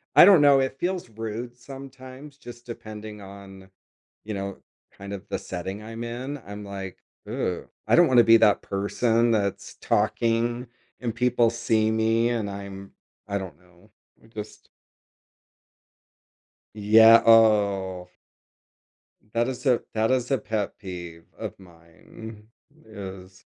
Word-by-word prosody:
I - - +10
don't 190 -5 +7
know, 140 -1 +6
it 130 0 -1
feels 180 -6 -2
rude 115 +2 -6
sometimes, 135 +2 -11
just 120 -4 -12
depending 110 -2 -9
on, 95 -1 -12 0.6
you 110 - -4
know, 100 -1 -5 0.3
kind 100 +1 -9
of 100 +1 -8
the - - -2
setting 95 +3 -6
I'm 115 +2 -7
in, 125 +5 -5
I'm 100 +1 -8
like, 95 -2 -7 0.3
"Ew, - - -3 0.2
I - - +4
don't 175 -1 +6
wanna 125 -2 +6
be 115 - +7
that 110 -2 +4
person 115 +4 +1
that's 100 -3 -2
talking, 115 +3 0 0.3
and 115 -2 -3
people 120 -1 +2
see 110 -1 +1
me, 110 +1 +2
and 115 -4 -2
I'm" 100 -1 -8 0.4
I 100 - -1
don't 95 -7 -7
know, 90 -1 -24 0.3
I - - -19
just 110 -1 -10 2.1
Yeah, 110 +2 +7
oh. 100 -5 +4 1.3
That 115 +1 +1
is 130 -1 -6
a 125 -3 +3
that 110 +1 +1
is 125 -2 0
a 135 - +2
pet 105 -2 -3
peeve 85 -4 -9
of - - -6
mine 95 +5 -14 0.4
is 95 -3 -10
110 Hz, 135 wpm, -25 LUFS, 100-120 Hz, 2.1 s, I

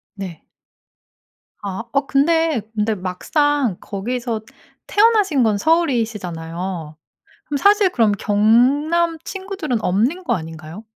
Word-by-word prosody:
네. 185 -6 -7 1.2
아. 200 +3 -4
어 275 0 +1
근데, 320 0 +2
근데 215 0 0
막상 250 - 0
거기서 235 +3 -3 0.5
태어나신 410 - +3
건 215 -2 +2
서울이시잖아요. 190 - -1 0.5
그럼 290 - -1
사실 405 +5 +4
그럼 225 - +2
경남 270 +12 +2
친구들은 375 - -4
없는 240 - +1
거 - - +1
아닌가요? 160 +4 -8
235 Hz, 235 characters per minute, -20 LUFS, 195-320 Hz, 1.2 s, 사실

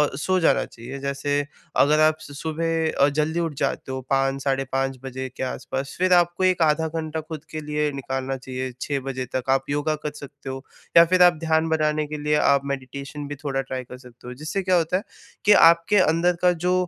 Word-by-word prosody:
सो 185 +6 0
जाना 165 - +3
चाहिए। 125 +4 -9
जैसे 140 +1 -1 0.5
अगर 150 +2 +3
आप 155 0 +4
स - - -10
सुबह 160 0 -1
अ, - - +3
जल्दी 155 +3 -1
उठ 165 -2 -1
जाते - - -2
हो 130 - -3
5 135 0 +1
साढ़े 135 -1 0
5 135 0 -1
बजे 130 0 -5
के - - -3
आस-पास 135 +1 -4
फिर 185 0 +3
आपको 175 +1 +3
1 185 -2 +3
आधा 160 +1 +1
घंटा 160 0 -4
खुद 155 -1 -8
के 150 -1 -1
निकालना 135 -1 -3
चाहिए, 130 0 -5
6 140 -2 -1
बजे 130 -1 -3
तक 130 0 -2
आप 135 0 +1
योगा 145 +2 0
कर 150 - -1
सकते 140 -1 -10
हो 135 0 -6 0.3
या 170 - +10
फिर 180 +1 +4
आप 175 - +7
ध्यान 160 0 +2
बनाने 155 -1 +1
के 150 +1 -5
लिए 150 0 +2
आप 140 -1 +4
मेडिटेशन 140 +1 -6
भी 145 - -5
थोड़ा 140 -2 -2
ट्राई 130 -1 -5
कर 125 0 -11
सकते 125 -1 -15
हो। 125 - -6
जिससे 165 +6 -2
क्या 185 0 +2
होता 170 +1 +2
है 195 - -5 0.4
कि 210 - +6
आपके 170 +2 +5
अंदर 175 0 +3
का 180 - +5
जो 180 - +3
150 Hz, 215 wpm, -23 LUFS, 135-165 Hz, 0.5 s, या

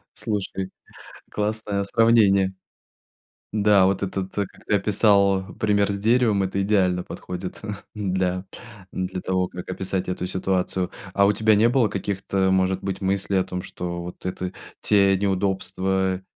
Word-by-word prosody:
Слушай, 95 -3 -3 0.6
классное 105 -1 -2
сравнение. 100 -3 +4 1.0
Да, 105 -2 +4
вот 95 +1 +1
этот, 95 0 -3
как 100 -2 0 0.2
ты 105 - +3
описал, 100 -1 +3
пример 100 -1 +2
с 100 - -2
деревом- 110 -2 +3
это 95 +1 -1
идеально 95 -3 +2
подходит, 90 +1 -7 0.4
да, 95 -2 -1 0.5
для 95 0 -3
того, 95 -1 0
как 90 - -9
описать 95 0 -2
эту 90 0 -3
ситуацию. 95 -1 -1 0.2
А 100 - +5
у 105 - +4
тебя 110 +1 +3
не 110 +3 +5
было 120 -2 +3
каких-то, 95 -1 -1
может 95 0 +1
быть, 95 0 -3
мыслей 95 0 0
о 95 - +3
том, 90 0 -5
что 85 -1 -5
вот 90 - -9
это 90 0 -3 0.3
те 100 -2 +4
неудобства, 95 -1 0
95 Hz, 140 wpm, -24 LUFS, 95-100 Hz, 1.0 s, А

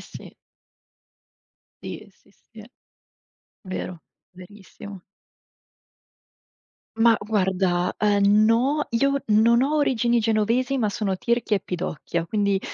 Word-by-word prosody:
sì. - - -12 1.5
Sì, - - -8
sì, 195 - -29
sì 220 0 -16 1.0
vero, 185 -4 -7 0.3
verissimo. 195 +1 -13 2.0
Mah 225 0 +4
guarda, 190 -4 0
ehm, 205 0 +3
no, 265 +7 +1
io 275 +3 0
non 230 +3 +4
ho 295 +3 0
origini 240 -5 +1
genovesi 230 +4 0
ma 220 - 0
sono 200 -2 -2
tirchia 235 0 0
e - - -4
pidocchia 170 -2 -4
quindi 200 -1 0
215 Hz, 100 wpm, -23 LUFS, 195-235 Hz, 2.0 s, Mah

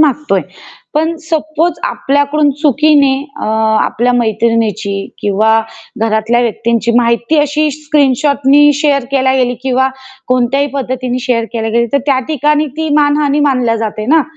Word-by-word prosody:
मागतोय. 295 0 +1 0.5
पण 320 +2 0
सपोज 315 +1 -1
आपल्याकडून 285 +2 +1
चुकीने 290 -1 +3 0.3
अ, - - -2 0.4
आपल्या 245 +2 0
मैत्रिणीची 225 -3 0 0.3
किंवा 220 +2 +2 0.4
घरातल्या 225 +2 +1
व्यक्तींची 235 0 -1
माहिती 235 +5 +1
अशी 300 +1 0
स्क्रीनशॉटने 290 -1 +2
शेअर 280 -4 +1
केल्या 265 -1 +1
गेली 250 -1 +1
किंवा 260 0 +1 0.4
कोणत्याही 255 +3 +1
पद्धतीने 255 -2 -3
शेअर 235 -2 0
केल्या 225 -1 -2
गेली, 235 +1 +1
तर 280 - +3
त्या 275 -2 +2
ठिकाणी 300 0 +1
ती 320 0 -2
मानहानी 290 0 +2
मानली 240 -4 0
जाते 215 -1 -4
ना. 315 +3 +4
265 Hz, 130 wpm, -13 LUFS, 235-295 Hz, 0.5 s, ना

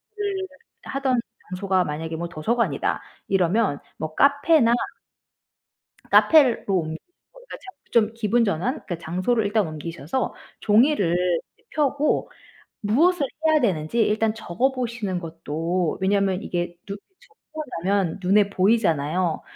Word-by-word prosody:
를 400 -2 -3 0.4
하던 270 -2 0 0.3
장소가 185 0 0
만약에 160 +2 -4
뭐 170 +2 -4
도서관이다 170 - -1 0.3
이러면 190 -3 +1 0.2
뭐 155 0 -5
카페나 285 -3 +4 1.4
카페를 285 -7 +5
로 195 - 0
옮 160 -1 -5 0.4
그러니까 - - -11
저 380 -7 -13
좀 225 -2 +3
기분전환? 225 - +1
그러니까 175 -3 -5
장소를 185 +7 0
일단 205 -1 +1
옮기셔서 160 - -4 0.3
종이를 210 - +3 0.5
펴고 290 0 0 0.5
무엇을 290 - +2 0.2
해야 315 -1 +4
되는지 180 0 0
일단 215 +1 +1
적어 230 +4 -1
보시는 235 -7 -3
것도 165 +1 -2
왜냐면 195 0 +1
이게 175 -3 -3
누 200 -1 -5 0.2
쭉 - - -24 0.2
적어 310 - -3 0.2
놓으면 195 -2 0
눈에 200 +2 +3
보이잖아요. 185 -5 +1
205 Hz, 280 characters per minute, -23 LUFS, 170-250 Hz, 1.4 s, 카페를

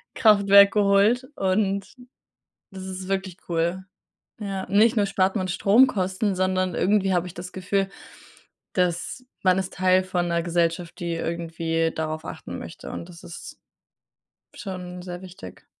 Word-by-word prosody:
Kraftwerk 200 -3 +6
geholt 205 +4 +3
und 195 +1 0 0.9
das 190 -1 -8
ist 185 0 -6
wirklich 190 -2 -2
cool. 170 +3 -1 0.6
Ja, 195 -2 -4
nicht 220 +3 +4
nur 205 -1 +3
spart 195 +1 +1
man 185 -2 -1
Stromkosten, 200 -1 +3
sondern 185 -1 0
irgendwie 195 0 +2
habe 180 0 +1
ich 180 - -9
das 180 +1 -8
Gefühl, 195 +1 -1 0.9
dass 180 +7 -1 0.2
man 185 -1 +4
ist 190 -1 -3
Teil 185 0 +3
von 180 -2 -1
'ner 170 0 0
Gesellschaft, 170 0 -1
die 170 -1 -2
irgendwie 165 -1 -2
darauf 155 0 -3
achten - - -7
möchte - - -9
und 170 - -7
das 170 +1 -13
ist 170 -1 -10 1.0
schon 180 -2 -7
sehr 180 0 -7
wichtig. 175 - -11
185 Hz, 140 wpm, -24 LUFS, 175-195 Hz, 1.0 s, Kraftwerk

